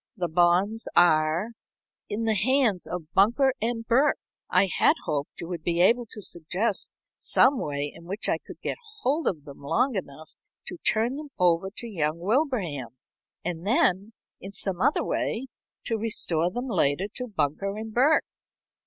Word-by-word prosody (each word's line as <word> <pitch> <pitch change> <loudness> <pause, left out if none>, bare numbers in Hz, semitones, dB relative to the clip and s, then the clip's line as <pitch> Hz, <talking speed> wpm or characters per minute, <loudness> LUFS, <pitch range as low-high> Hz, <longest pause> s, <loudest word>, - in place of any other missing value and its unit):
"The 180 -2 -1
bonds 180 +6 +2
are 165 +3 +4 0.3
" - - -58
"In 215 +3 -2
the 220 - +2
hands 230 -3 +2
of 165 -2 -6
Bunker 240 +7 +4 0.2
& 230 -1 -7
Burke. 265 +5 +3 0.3
I 185 +2 +4
had 185 - +3
hoped 145 -1 -3
you 170 - -6
would 175 -3 -4
be 170 +1 -1
able 230 +6 +4
to 210 -1 -7
suggest 185 +6 -2 0.3
some 275 -2 +4
way 145 0 -3
in 170 - -14
which 195 +5 -2
I - - +1
could - - -12
get - - -2 0.2
hold 295 +5 0
of 155 -6 -1
them 140 -2 -11
long 165 - +1
enough 155 -6 -6 0.3
to 360 - -6
turn 235 -2 +1
them 300 -1 -8
over 180 +1 +2
to 235 - -4
young 160 -7 -1
Wilbraham, 180 - -1 0.5
and 170 -1 -3
then, 205 -2 +2 0.3
in 195 +1 -9
some 190 -2 -3
other 290 - +3
way, 240 +4 -2 0.4
to 225 -1 -1
restore 175 -6 0
them 245 +7 -4
later 175 - +1
to 250 -1 -4
Bunker 195 - -1
& - - -7
Burke." 250 +8 +3
195 Hz, 170 wpm, -26 LUFS, 165-230 Hz, 0.5 s, are